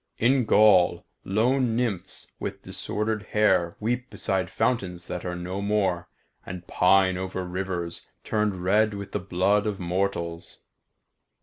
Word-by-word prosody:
In 125 +1 +3
Gaul 100 -5 +5 0.2
lone 120 +4 +1
nymphs 105 -7 -2
with - - -5
disordered 110 0 -3
hair 105 -5 +2
weep 125 +4 -2
beside 95 -2 -1
fountains 95 -7 -1
that 90 0 -5
are 90 0 -3
no 90 +3 -4
more, 95 -4 0 0.3
and 90 -1 -8
pine 95 0 +3
over 95 0 -4
rivers 90 -2 -4 0.2
turned 105 -4 -1
red 105 +3 +3
with 100 -1 -7
the - - -1
blood 100 +3 +1
of 105 -2 -2
mortals. 85 -2 -3
95 Hz, 130 wpm, -26 LUFS, 90-105 Hz, 0.3 s, Gaul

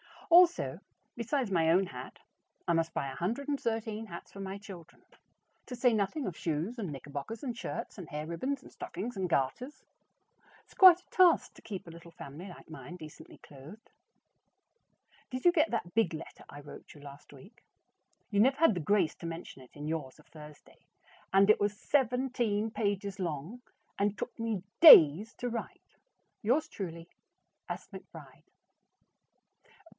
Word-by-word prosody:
Also, 350 0 +5 0.4
besides 240 -1 -1
my 165 -3 +2
own 185 +3 +3
hat, 185 - -9 0.5
I 170 - +3
must 165 0 0
buy 140 - -2
113 225 - -3
hats 170 -3 -10
for 195 - -11
my 195 0 -5
children, 185 -5 -13 0.6
to 250 - -6
say 245 -1 +3
nothing 220 +8 -1
of 175 - -5
shoes 170 +9 -3
and 195 -6 -3
knickerbockers 145 - -7
and 245 -4 -3
shirts 230 0 -6
and 180 -5 -9
hair 150 0 -5
ribbons 260 - -3
and - - -14
stockings 240 +3 -6
and 190 -2 -2
garters. 170 - -2 0.8
It's - - -22
quite 365 -2 +8
a - - -34
task 360 -3 +4
to - - -16
keep 200 -4 -7
a 170 - -10
little 170 0 -13
family 160 +3 -10
like 180 - -13
mine 165 +2 -9
decently 155 -4 -12
clothed. 150 +10 -14 1.4
Did 255 -1 -5
you 350 - +8
get 330 -2 +2
that 195 -7 -3
big 220 -7 +2
letter 160 - -9
I 145 - -10
wrote 145 - -12
you 145 - -14
last 145 0 -13
week? 200 - -17 0.7
You 200 - +1
never 265 +5 +4
had 330 -7 +5
the 180 - -3
grace 175 -1 +2
to - - -10
mention 165 -4 -8
it 130 - -18
in 145 0 -7
yours 155 -5 -4
of 150 - -21
Thursday, 150 -1 -15 0.5
and 195 +1 +5
it 215 - +6
was 205 0 0
seventeen 245 -5 0
pages 200 -2 -2
long, 175 - -4 0.4
and 205 +1 0
took 245 - -6
me 225 -5 -2 0.2
DAYS 200 - +9
to 245 - -4
write. 235 0 -7 0.4
Yours 270 +9 +1
truly, 170 - -7 0.6
S. - - -6
McBRIDE. - - -12
200 Hz, 160 wpm, -31 LUFS, 165-240 Hz, 1.4 s, DAYS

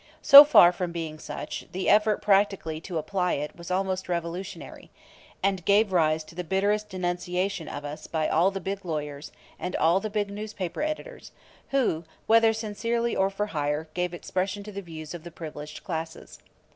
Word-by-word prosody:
So 280 +1 +12
far 275 -12 +7
from 180 -1 -4
being 160 -2 -5
such, - - -6
the 185 +1 -3
effort 210 0 +3
practically 195 -6 +1
to 175 -1 -5
apply 180 +3 -1
it 150 +1 -4
was 170 0 -10
almost 185 0 -1
revolutionary, 175 +2 -5 0.5
and 195 -3 +1
gave 205 +3 +3
rise 155 -2 +2
to 155 - -15
the 180 +2 -4
bitterest 205 +4 0
denunciation 180 -1 -2
of 145 - -6
us 145 +1 -7
by 160 -2 -1
all 170 +4 +3
the 195 0 -5
big 195 +1 -4
lawyers, 150 -4 -5 0.3
and 180 - -4
all 165 +4 +3
the 215 - -4
big 205 -1 -2
newspaper 205 - -5
editors, 310 +11 -5 0.4
who, 245 -12 +1 0.2
whether 225 0 +5
sincerely 230 +2 -2
or 190 0 +2
for 195 +1 -2
hire, 150 +1 -2
gave 180 0 -1
expression 185 +3 -3
to 210 - -9
the 200 0 -6
views 160 -3 -9
of 170 -2 -8
the 170 - -8
privileged 150 -2 -9
classes. 165 -4 -6
185 Hz, 175 wpm, -26 LUFS, 165-205 Hz, 0.5 s, So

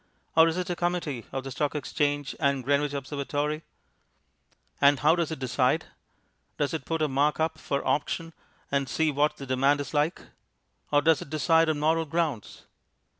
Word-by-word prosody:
Or 160 0 +7
is 165 +1 -1
it 180 -1 -2
a - - -1
Committee 170 -8 -2
of 135 - -3
the 135 - -6
Stock 150 +2 -1
Exchange 145 -1 -1
and 140 -3 +1
Greenwich 145 +2 +1
Observatory? 145 +2 -2 1.2
And 140 -1 +5
how 155 +3 +5
does 170 -3 -1
it 160 - -4
decide? 130 +4 +1 0.7
Does 145 0 -1
it 155 -5 -4
put 160 -1 -1
a - - +3
mark 145 +3 +1
up 160 0 0
for 140 -2 -2
auction 165 +3 -1 0.4
and 140 -2 0
see 160 +4 +1
what 145 +2 +1
the 135 - -7
demand 135 +2 +2
is 145 - -5
like? 150 +4 +1 0.7
Or 145 0 +4
does 160 -1 +4
it - - -8
decide 160 +1 +3
on 155 - +1
moral 160 +2 +2
grounds? 155 -7 -3
145 Hz, 175 wpm, -27 LUFS, 140-160 Hz, 1.2 s, Or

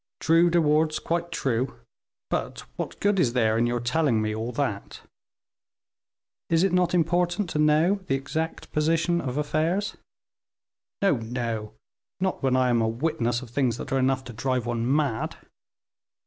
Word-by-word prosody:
"True, 165 +2 +4
De 170 0 +3
Wardes, 155 0 +2
quite 170 +1 -2
true; 130 -3 -1 0.6
but - - -2
what - - -5
good 205 -1 +2
is 125 -9 +2
there 110 -3 +2
in 115 +1 +2
your 120 0 0
telling 120 0 +1
me 110 0 -1
all 110 +3 -3
that?" 115 -6 -3 1.5
"Is 165 +1 +3
it 195 -2 +2
not 180 0 +2
important 175 +2 +1
to 150 - -1
know 155 +6 +3
the 135 - +1
exact 160 +4 -4
position 165 +3 +1
of 130 0 -4
affairs?" 160 +7 0 1.1
"No, 195 -9 +4
no; 115 -2 -4 0.5
not 190 0 -1
when 135 -2 +2
I 130 -1 +3
am 120 -1 +3
a 110 - +2
witness 120 -1 -1
of 120 - -12
things 125 -3 +1
that 130 - -7
are 135 - +2
enough 130 0 +1
to 125 -2 -9
drive 125 +2 -1
one 120 +1 -1
mad." 140 -6 0
135 Hz, 160 wpm, -26 LUFS, 120-165 Hz, 1.5 s, True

